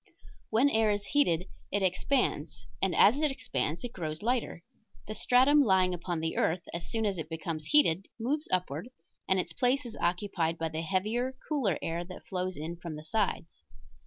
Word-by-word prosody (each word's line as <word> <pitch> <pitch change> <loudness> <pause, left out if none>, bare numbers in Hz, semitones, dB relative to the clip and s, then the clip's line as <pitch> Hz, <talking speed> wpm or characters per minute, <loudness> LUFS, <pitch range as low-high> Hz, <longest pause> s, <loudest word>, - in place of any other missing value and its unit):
When 230 +6 +4
air 220 -5 +3
is 205 -1 0
heated 180 - +2 0.3
it 205 0 0
expands, 185 - 0 0.2
and 190 -2 +2
as 260 +8 +6
it 305 - +3
expands 175 - -2
it 245 - -5
grows 155 -1 -5
lighter. 235 -7 -1 0.4
The 215 - -4
stratum 260 +6 +5
lying 190 -6 +3
upon 175 -1 -3
the 160 0 -2
earth 170 +2 +1
as 170 0 -4
soon 225 -1 -1
as 195 -4 -1
it 155 -1 -5
becomes 160 -1 -4
heated 195 - +3
moves 290 +7 -1
upward 180 - -1 0.4
and 190 0 +3
its 170 -2 -3
place 255 - +1
is 230 - -7
occupied 175 -2 0
by 165 0 -2
the 160 0 -3
heavier, 215 +9 -1
cooler 255 - +1
air 165 +1 -2
that 180 +1 -11
flows 185 -1 -3
in 160 +3 -5
from 170 -3 -6
the 150 - -8
sides. 170 - -2
185 Hz, 185 wpm, -30 LUFS, 165-235 Hz, 0.4 s, as